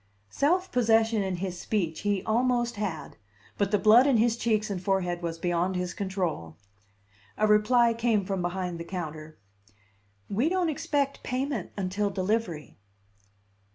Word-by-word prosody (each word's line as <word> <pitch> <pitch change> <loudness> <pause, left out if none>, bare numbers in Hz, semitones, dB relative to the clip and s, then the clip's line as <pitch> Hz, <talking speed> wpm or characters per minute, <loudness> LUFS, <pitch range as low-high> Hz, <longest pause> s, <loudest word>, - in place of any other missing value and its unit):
Self 365 +6 +1
possession 225 -2 +3
in 190 -2 -2
his 180 0 -4
speech 175 -7 -2
he 200 -2 -1
almost 240 +1 +1
had; 195 -7 -4 0.4
but 200 -2 +2
the 205 - +3
blood 225 +6 +6
in 270 -4 +4
his 230 +1 +3
cheeks 215 -3 0
and 185 -3 -3
forehead 180 -2 -1
was 165 -1 -4
beyond 175 +2 0
his 180 0 -2
control. 175 - -3 0.8
A 215 - +2
reply 230 +3 +4
came 225 -3 +1
from 195 -1 -2
behind 175 -1 -3
the - - -4
counter: 155 -3 -7 0.9
"We 235 +10 +1
don't 365 -2 +1
expect 280 -2 -1
payment 255 -5 -3
until 200 +2 -1
delivery." 185 - -2
205 Hz, 145 wpm, -27 LUFS, 180-235 Hz, 0.9 s, blood